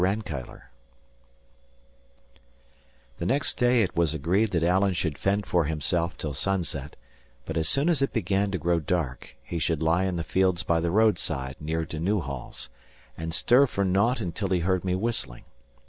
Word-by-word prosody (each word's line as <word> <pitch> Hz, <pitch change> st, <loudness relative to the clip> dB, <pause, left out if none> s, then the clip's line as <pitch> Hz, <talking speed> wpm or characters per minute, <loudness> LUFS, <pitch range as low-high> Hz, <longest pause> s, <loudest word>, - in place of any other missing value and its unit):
RANKEILLOR 95 Hz, -, -3 dB, 2.5 s
The 85 Hz, -, -3 dB
next 140 Hz, +5 st, 0 dB
day 125 Hz, -1 st, +4 dB
it 95 Hz, -, -3 dB
was 85 Hz, -2 st, +2 dB
agreed 90 Hz, +9 st, +1 dB
that 85 Hz, -4 st, 0 dB
Alan 95 Hz, +3 st, +3 dB
should 80 Hz, -4 st, -1 dB
fend 100 Hz, +7 st, 0 dB
for 85 Hz, -3 st, +1 dB
himself 85 Hz, +2 st, -1 dB
till 75 Hz, -2 st, -4 dB
sunset; 80 Hz, -2 st, -2 dB, 0.5 s
but 80 Hz, -, -5 dB
as 80 Hz, -1 st, 0 dB
soon 140 Hz, +3 st, +2 dB
as 165 Hz, -6 st, +2 dB
it 135 Hz, -, +1 dB
began 100 Hz, -2 st, 0 dB
to 95 Hz, -, -2 dB
grow 85 Hz, -1 st, +1 dB
dark, 75 Hz, -5 st, -3 dB
he 85 Hz, -, -4 dB
should 80 Hz, -1 st, 0 dB
lie 85 Hz, +4 st, +2 dB
in 95 Hz, -2 st, -1 dB
the 85 Hz, -, -2 dB
fields 95 Hz, +1 st, +1 dB
by 85 Hz, -1 st, +1 dB
the 85 Hz, +1 st, 0 dB
roadside 85 Hz, -10 st, +1 dB
near 80 Hz, +2 st, -2 dB
to 80 Hz, -, -6 dB
Newhalls, 80 Hz, -, -3 dB, 0.5 s
and 80 Hz, 0 st, -5 dB
stir 125 Hz, +11 st, +4 dB
for 100 Hz, -4 st, -1 dB
naught 105 Hz, +7 st, +2 dB
until 95 Hz, +1 st, -3 dB
he 90 Hz, -2 st, +1 dB
heard 90 Hz, +1 st, +1 dB
me 90 Hz, -1 st, 0 dB
whistling. 105 Hz, -, -2 dB
90 Hz, 170 wpm, -26 LUFS, 80-100 Hz, 2.5 s, day